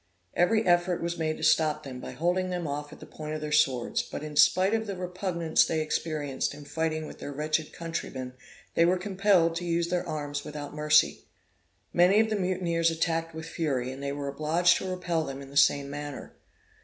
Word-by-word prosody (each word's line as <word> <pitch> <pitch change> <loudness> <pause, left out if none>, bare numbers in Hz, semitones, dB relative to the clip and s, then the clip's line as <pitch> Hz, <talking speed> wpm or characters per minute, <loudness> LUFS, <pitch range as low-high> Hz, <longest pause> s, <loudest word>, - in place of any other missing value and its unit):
Every 215 +6 +3
effort 175 0 +2
was 170 0 -3
made 155 -1 -1
to - - -8
stop 155 -1 +3
them, 130 -2 -7
by - - -7
holding 180 +3 0
them 180 -2 -3
off 145 0 -4
at - - -12
the - - -10
point 155 0 -6
of 155 - -5
their 150 0 -4
swords; 135 -5 +2
but, - - -7
in 150 -1 -7
spite 185 +6 +5
of 220 -1 0
the 200 - -3
repugnance 180 -2 +1
they 160 - -1
experienced 155 -3 -2
in 145 0 -11
fighting 155 +1 -2
with - - -10
their 145 - -6
wretched 155 +2 -1
countrymen, 140 -6 -5 0.4
they 165 - +4
were 180 +2 +3
compelled 185 -3 +2
to 175 - -4
use 170 0 0
their 180 0 -1
arms 145 -1 -3
without 145 -1 -7
mercy. 150 0 +3 0.7
Many 180 +4 +5
of 220 0 +2
the - - +2
mutineers 180 -3 +1
attacked 165 0 -1
with 160 0 -6
fury, 140 -6 -2
and 135 +1 -8
they 140 0 -2
were 140 0 -4
obliged 165 +5 +3
to 190 - -4
repel 175 -3 -1
them 135 -2 -6
in 135 0 -10
the - - -13
same 140 0 +4
manner. 145 -1 -7
160 Hz, 205 wpm, -28 LUFS, 150-175 Hz, 0.7 s, spite